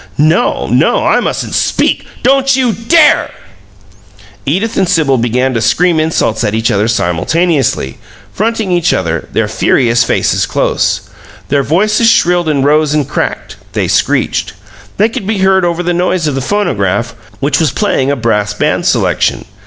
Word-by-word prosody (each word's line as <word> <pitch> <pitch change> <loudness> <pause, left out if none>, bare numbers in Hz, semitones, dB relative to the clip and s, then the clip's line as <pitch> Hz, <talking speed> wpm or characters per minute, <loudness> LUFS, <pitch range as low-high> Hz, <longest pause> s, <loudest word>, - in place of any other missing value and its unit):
"No! 155 +9 +1
No! - - +1
I - - +3
mustn't - - -3
SPEAK - - 0
" - - -23
"Don't 270 +1 +3
you 255 -4 +1
DARE!" 300 - +3 1.2
Edith 195 +10 -1
and 185 - 0
Sibyl 150 -8 +2
began 125 +3 0
to 115 - -1
scream 175 +5 +2
insults 155 -8 0
at 105 -1 -1
each 110 0 0
other 105 +2 +1
simultaneously, 115 - 0 0.3
fronting 220 -2 -1
each 175 -1 +1
other, 85 -3 -2
their - - 0
furious 120 -1 +1
faces - - 0
close. - - 0 0.5
Their 140 0 +2
voices 215 - +2
shrilled 175 -5 +2
and 140 -3 0
rose 150 0 +2
and 150 -3 0
cracked - - -4 0.2
they - - -1
screeched. - - 0 0.4
They 210 - +3
could 215 -3 -6
be 215 -1 -1
heard 190 0 +2
over 175 0 -1
the 175 0 -1
noise 175 -1 0
of 150 - -1
the 135 - -2
phonograph, 120 - -1 0.3
which 140 +2 0
was 160 -3 +2
playing 140 -10 -1
a 140 - +1
brass 110 -4 -1
band - - 0
selection. - - 0
155 Hz, 160 wpm, -12 LUFS, 125-190 Hz, 1.2 s, I